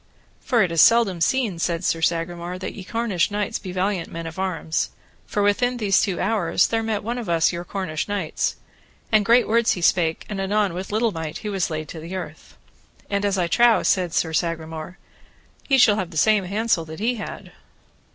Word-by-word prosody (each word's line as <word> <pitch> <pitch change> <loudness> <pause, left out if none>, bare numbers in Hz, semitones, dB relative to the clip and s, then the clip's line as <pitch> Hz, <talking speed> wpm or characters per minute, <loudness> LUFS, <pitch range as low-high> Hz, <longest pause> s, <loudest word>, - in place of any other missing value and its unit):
For 235 -4 +2
it 180 - -1
is 165 -2 +4
seldom 220 -7 +4
seen, 220 -2 +1
said 170 +1 -1
Sir 165 -2 0
Sagramore, 170 +2 -1
that 185 - -5
ye 195 - -8
Cornish 220 -4 0
knights 210 +2 -2
be 185 - -7
valiant 185 -1 -1
men 165 0 -6
of 165 +2 -7
arms; 170 -4 -1 0.4
for 205 - 0
within 245 +5 +2
these 200 -4 +3
two 190 -3 -1
hours 195 -5 +2
there 225 0 0
met 220 -2 -2
us - - -18
one 235 +3 -3
of 170 -8 +1
your 175 0 -5
Cornish 175 -5 -4
knights, 200 -6 -2 0.6
and 215 -1 +4
great 235 +4 +4
words 230 +1 +3
he 180 - -5
spake, 165 -3 +2
and 200 -2 -4
anon 200 -1 +1
with 185 +3 -6
little 220 +2 +1
might 160 -3 -5
he - - -1
was 195 -3 -1
laid 155 -1 -4
to 165 - -7
the 165 +4 -7
earth. 185 - -8 0.5
And, 200 0 0
as 200 -1 +1
I 180 - +1
trow, 235 +6 +4
said 180 -3 +1
Sir 160 0 0
Sagramore, 160 +1 -3 0.7
ye 270 - +4
shall 215 -5 +5
have 185 -5 -2
the 165 - -8
same 210 +2 +3
handsel 205 -2 0
that 160 +2 -9
he 235 +3 0
had. 210 - -8
190 Hz, 205 wpm, -23 LUFS, 170-215 Hz, 0.7 s, shall